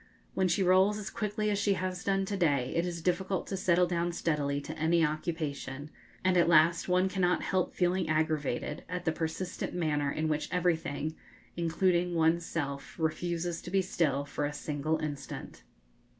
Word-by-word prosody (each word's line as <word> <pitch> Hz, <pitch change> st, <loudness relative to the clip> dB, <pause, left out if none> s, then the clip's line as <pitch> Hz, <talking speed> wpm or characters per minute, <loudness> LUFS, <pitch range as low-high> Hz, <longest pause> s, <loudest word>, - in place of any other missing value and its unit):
When 190 Hz, -1 st, +2 dB
she 185 Hz, +3 st, +2 dB
rolls 190 Hz, +3 st, +4 dB
as 210 Hz, -2 st, -5 dB
quickly 210 Hz, 0 st, -1 dB
as 200 Hz, -, 0 dB
she 200 Hz, 0 st, +2 dB
has 185 Hz, -1 st, -3 dB
done 195 Hz, -1 st, +1 dB
to 200 Hz, -, -3 dB
day, 145 Hz, -9 st, +1 dB
it 170 Hz, +1 st, +1 dB
is 170 Hz, -2 st, -5 dB
difficult 185 Hz, +1 st, 0 dB
to 195 Hz, -, -4 dB
settle 180 Hz, -2 st, +3 dB
down 175 Hz, 0 st, -1 dB
steadily 145 Hz, -4 st, 0 dB
to -, -, -7 dB
any 165 Hz, +1 st, +3 dB
occupation, 150 Hz, -3 st, -4 dB, 0.3 s
and 185 Hz, -1 st, +3 dB
at 170 Hz, -1 st, +4 dB
last 165 Hz, +2 st, +4 dB
one 180 Hz, +1 st, +3 dB
cannot 185 Hz, -2 st, +1 dB
help 185 Hz, -2 st, 0 dB
feeling 180 Hz, -1 st, +1 dB
aggravated 155 Hz, -2 st, -1 dB
at 180 Hz, 0 st, -4 dB
the 160 Hz, -, +3 dB
persistent 160 Hz, +4 st, -3 dB
manner 150 Hz, -4 st, 0 dB
in 155 Hz, +2 st, -1 dB
which 150 Hz, -1 st, -1 dB
everything, 160 Hz, -3 st, 0 dB, 0.4 s
including 175 Hz, +1 st, +1 dB
one's 165 Hz, +1 st, +2 dB
self, 140 Hz, -3 st, -4 dB
refuses 170 Hz, +1 st, -1 dB
to -, -, -8 dB
be 190 Hz, +1 st, +2 dB
still 145 Hz, -6 st, 0 dB
for 145 Hz, -, -4 dB
a 145 Hz, -, -3 dB
single 150 Hz, +1 st, -1 dB
instant. 145 Hz, -2 st, -6 dB
170 Hz, 175 wpm, -30 LUFS, 155-185 Hz, 0.4 s, rolls